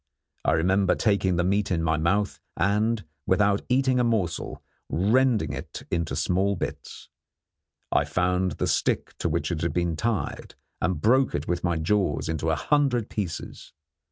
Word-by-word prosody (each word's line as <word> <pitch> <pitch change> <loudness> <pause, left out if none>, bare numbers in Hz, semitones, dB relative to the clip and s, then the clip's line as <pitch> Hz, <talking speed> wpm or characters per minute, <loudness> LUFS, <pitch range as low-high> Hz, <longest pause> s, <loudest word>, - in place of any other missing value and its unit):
I - - +2
remember 95 +4 +2
taking 100 -4 +1
the 90 - +1
meat 100 +3 +1
in 85 -3 0
my 80 0 +2
mouth 100 +6 0 0.2
and, 105 0 +1 0.2
without 100 +1 +3
eating 130 0 +3
a - - +3
morsel, 105 -8 -1 0.3
rending 110 - +2
it - - -7
into 85 -2 -1
small 95 +2 +1
bits. - - -6 0.8
I - - +3
found 90 -1 0
the - - -2
stick - - 0
to - - 0
which - - -1
it 80 -2 -2
had 85 -3 -1
been 85 -1 0
tied 110 +6 -3 0.3
and 90 -4 0
broke 130 - +3
it 75 +2 -3
with 85 0 -1
my 85 -2 +1
jaws 80 -3 0
into 80 0 -1
a 80 - +2
hundred 135 - +1
pieces. 90 -7 -5
95 Hz, 160 wpm, -26 LUFS, 85-105 Hz, 0.8 s, without